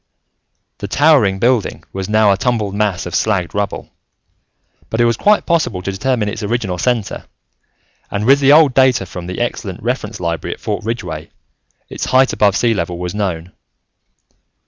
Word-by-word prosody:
The 100 - -5
towering 135 -6 +3
building 120 0 0
was 95 0 -4
now 110 -1 +4
a - - +3
tumbled 105 -2 -1
mass 100 -3 -1
of 90 - -7
slagged 100 -5 0
rubble, 100 0 -3 1.0
but 110 - -3
it 120 - +4
was 115 0 +2
quite 210 - +2
possible 155 - 0
to 100 - -2
determine 110 +2 -1
its 105 +2 -4
original 105 -4 -2
center, 120 -3 -1 0.8
and 100 +1 -2
with 135 +3 +5
the 140 0 +4
old 150 -3 +6
data 130 -5 +3
from 90 -1 -8
the 90 - -5
excellent 105 -6 -4
reference 115 -3 -3
library 85 -2 -3
at - - -27
Fort - - -3
Ridgeway, 100 -9 -5 0.6
its - - -5
height 130 +1 +3
above 100 -2 +2
sea 120 -2 +2
level 85 -3 -3
was 90 0 -4
known. 90 -4 -3
105 Hz, 170 wpm, -17 LUFS, 95-125 Hz, 1.0 s, old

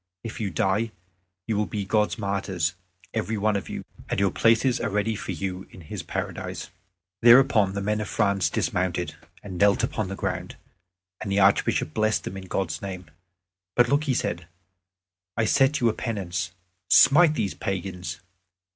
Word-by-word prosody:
If 115 - -6
you 105 - -1
die, 95 +6 0 0.5
you 110 - -1
will 105 +1 0
be 100 -2 -3
God's 105 +3 +1
martyrs, 95 -5 -1 0.4
every 110 0 -1
one 105 +1 +1
of 100 - -3
you, - - -5 0.3
and - - 0
your 100 -2 +2
places 115 +5 +3
are 110 - -1
ready 105 +2 0
for 100 - -5
you 95 +2 -4
in 90 - -13
His 75 - -6
Paradise." - - -5 0.5
Thereupon 120 -5 +6
the 100 0 -3
men 105 +1 0
of 105 - -5
France 100 -2 +1
dismounted, 90 -3 -1 0.3
and 95 -3 -7
knelt 100 0 +4
upon 110 -3 -1
the 100 - -5
ground, - - -3 0.6
and 100 - -4
the 100 - +2
Archbishop 95 -5 +3
blessed 110 0 +1
them - - -6
in 95 -1 -7
God's 90 -3 -2
name. 90 -5 -7 0.6
"But 120 -1 +4
look," 145 +3 +2
said 125 - 0
he, 85 - -17 0.9
"I 115 - +2
set 135 +6 +3
you 120 - +3
a 110 - +2
penance 95 -7 -3 0.4
smite 155 +2 +7
these 100 -9 -1
pagans." 95 -1 -4
100 Hz, 170 wpm, -25 LUFS, 95-110 Hz, 0.9 s, smite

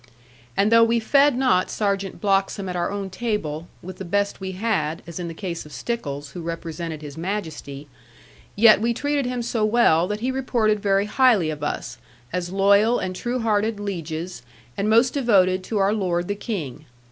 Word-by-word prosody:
And 205 +2 +3
though 230 0 +7
we 230 +1 +3
fed 280 +3 +4
not 250 -9 +2
Sergeant 200 -2 -2
Bloxham 195 -1 0
at 180 - -4
our 175 -1 0
own 200 -1 -4
table, 185 -7 -3 0.2
with 185 +1 -8
the - - -4
best 200 +3 -1
we 190 0 -4
had 185 -6 -1
(as 170 +1 -7
in 175 - -4
the 165 - -7
case 175 -2 -5
of 150 - -14
Stickles, 145 -13 -4
who 175 - -7
represented 165 -1 -5
His 145 +1 -8
Majesty), 160 -7 -5 0.7
yet 215 0 +6
we 235 +1 +1
treated 285 0 -1
him 250 -1 -2
so 230 -2 -1
well, 210 -7 +4
that 210 +2 -4
he 255 +2 0
reported 235 -5 +1
very 200 0 +2
highly 215 - +3
of 150 -1 -7
us, 125 -4 -4 0.3
as 180 -1 -2
loyal 200 +4 +4
and 185 0 -3
true 245 +5 -2
hearted 215 -1 0
lieges, 175 -4 -5 0.3
and 200 +2 -1
most 230 +3 +4
devoted 190 -9 +3
to 220 - -2
our 200 +1 +3
lord 175 -4 -1
the 205 - 0
King. 165 - -5
200 Hz, 185 wpm, -23 LUFS, 170-225 Hz, 0.7 s, though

